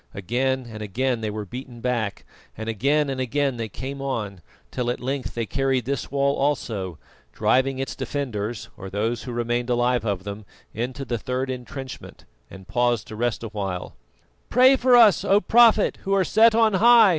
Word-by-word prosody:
Again 130 +6 -1
and 110 -2 -8
again 120 +4 -1
they 110 - -2
were 105 0 -5
beaten 125 +3 -9
back, 115 -4 -2 0.3
and 110 +1 -6
again 140 +7 +1
and 135 -1 -3
again 135 +1 0
they 115 -1 -4
came 135 +6 -6
on, 105 -9 -3 0.3
till 125 -2 -2
at 120 - -2
length 135 +1 -4
they 115 -1 -1
carried 135 +1 0
this 140 +2 -3
wall 140 0 +1
also, 110 - -1 0.4
driving 130 +1 +2
its 135 0 -4
defenders, 120 -6 -4
or 95 - -8
those 110 +4 -2
who 125 - -5
remained 120 +1 -1
alive 120 -1 +1
of 100 -4 -2
them, 100 +1 -7 0.3
into 130 +5 -4
the 120 -3 -2
third 130 +3 -2
entrenchment, 130 +1 -8 0.2
and 95 -1 -12
paused 120 +1 +1
to 110 - -7
rest 120 +1 -1
awhile. 100 -5 -5 0.5
"Pray 255 +2 +6
for 255 -1 +4
us, 225 -5 +6
O 200 +1 +4
Prophet 225 +2 +4
who 195 0 0
are 190 -2 +2
set 220 +5 +5
on 225 -2 +4
high!" 230 +2 +7
125 Hz, 180 wpm, -24 LUFS, 110-140 Hz, 0.5 s, high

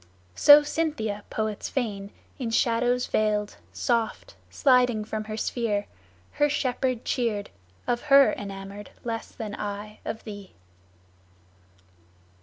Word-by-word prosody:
So 290 - +8
Cynthia, 290 -10 -2
poets 215 -1 -3
feign, 205 -6 -3 0.3
In 245 -3 -2
shadows 245 +2 +2
veiled, 210 -1 0
soft, 235 - -1
sliding 250 -5 +3
from 215 0 -4
her 215 0 -5
sphere, 215 -3 -1 0.5
Her 295 0 +2
shepherd 255 -3 -1
cheered, 225 -6 -1 0.3
of 240 0 0
her 275 0 +7
enamoured 200 0 -7
less 230 -1 -4
Than 220 -4 -6
I 210 +1 -6
of 220 - -5
thee." 205 -3 -9
225 Hz, 110 wpm, -26 LUFS, 210-250 Hz, 0.5 s, So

